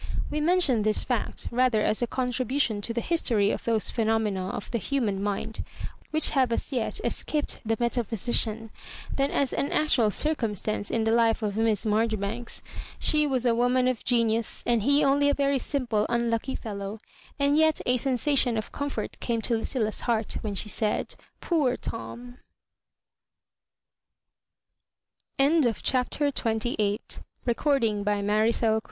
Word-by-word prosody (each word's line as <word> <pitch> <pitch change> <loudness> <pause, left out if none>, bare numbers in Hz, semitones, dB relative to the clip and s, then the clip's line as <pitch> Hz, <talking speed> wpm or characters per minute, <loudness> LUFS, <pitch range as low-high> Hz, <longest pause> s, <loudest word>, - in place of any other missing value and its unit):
We 300 - -1
mention 315 -8 +3
this 215 0 +3
fact 245 -4 -3
rather 250 -2 +2
as 215 - +1
a 240 - +1
contribution 250 -2 -1
to 230 - -2
the 235 +1 -2
history 230 -12 +2
of - - -4
those 225 -2 +2
phenomena 215 -4 0
of 200 - -6
the 235 - 0
human 220 -6 -1
mind, 205 +2 -3 0.5
which 310 +1 +3
have 260 -4 +2
as 230 - -2
yet 245 - -1
escaped 300 -1 -1
the 225 0 -1
meta 240 0 +1
physician, 225 0 -1 0.4
than 275 0 +1
as 280 -3 0
an 280 - -1
actual 255 -8 +3
circumstance 215 - -1
i^ 225 -1 0
the 225 - +2
life 230 -1 +2
of 205 -2 -2
Miss 225 0 +1
Marjoribanks. 220 +1 -1 0.3
She 300 -1 +2
was 260 -3 0
a 240 - +4
woman 250 +2 +2
of 255 -3 -1
gonitis, 230 -2 +1
and 235 -2 +2
he 285 +6 +3
only 285 +1 +3
a 285 - +2
very 280 -1 +1
simple, 240 -7 -1
unlucky 235 +2 -1
fel 215 -4 -6
low; 200 +2 -5 0.4
and 280 0 +2
yet 315 0 +3
a 250 0 +2
sensation 255 -1 +2
of 220 - -4
comfort 285 0 -4
came 235 -1 -1
to 240 - +1
Liv 225 - -2
cilia's 220 -5 -1
heart 225 -2 0
when 210 -2 -4
she 195 - +1
said 210 0 -1
" - - -41
Poor 290 -8 +1
Tom 245 +2 -7 3.0
1"^ 275 -4 +3
CHAPTER 275 +3 +1
XXIX 220 -4 0 0.5
Miss 240 -2 +1
Marjoribank 220 -3 +1
235 Hz, 155 wpm, -26 LUFS, 220-270 Hz, 3.0 s, a